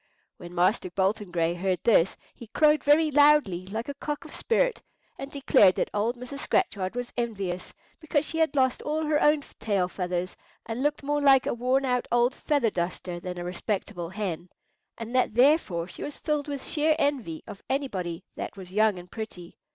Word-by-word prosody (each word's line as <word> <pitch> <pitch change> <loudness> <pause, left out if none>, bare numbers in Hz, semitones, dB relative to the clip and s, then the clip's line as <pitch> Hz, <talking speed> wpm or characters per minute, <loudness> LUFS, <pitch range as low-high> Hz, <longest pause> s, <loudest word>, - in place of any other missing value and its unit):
When 175 0 -10
Master 185 +2 +2
Bolton 195 +2 0
Gray 170 -1 0
heard 185 +1 -1
this 190 -6 +3 0.2
he 235 - -12
crowed 300 +6 +3
very 305 +2 +4
loudly, 285 -11 +4
like 220 +4 -4
a 285 - -4
cock 295 +1 -5
of - - -11
spirit, - - 0 0.4
and 275 - -6
declared 210 -9 +4
that - - -1
old 225 +4 0
Mrs. 250 +3 -8
Scratchard 200 - 0
was 245 0 -4
envious, 195 -7 -3 0.3
because 315 -2 0
she 325 - -3
had 320 -2 +2
lost 260 -2 +2
all 310 +1 -2
her 300 -1 +1
own 300 0 +4 0.2
tail 200 -4 0
feathers, 180 0 -3 0.3
and 225 +2 -4
looked 295 +1 0
more 290 +1 0
like 270 -2 +5
a - - 0
worn 255 +3 +1
out 250 -1 0
old 240 +2 +3
feather 280 -8 0
duster 175 0 -3
than 180 0 -6
a 175 - -4
respectable 180 -1 -3
hen, 185 -3 -4 0.5
and 230 +1 -7
that 250 -4 +2
therefore 245 - +3
she - - -10
was 290 - -5
filled 300 -2 -2
with 280 -2 -5
sheer 310 0 +3
envy 265 - -1
of 200 - -9
anybody 190 -11 -2
that - - -6
was 185 -1 -10
young 215 -1 +3
and 180 0 -11
pretty. 185 -6 -8
230 Hz, 190 wpm, -27 LUFS, 185-285 Hz, 0.5 s, like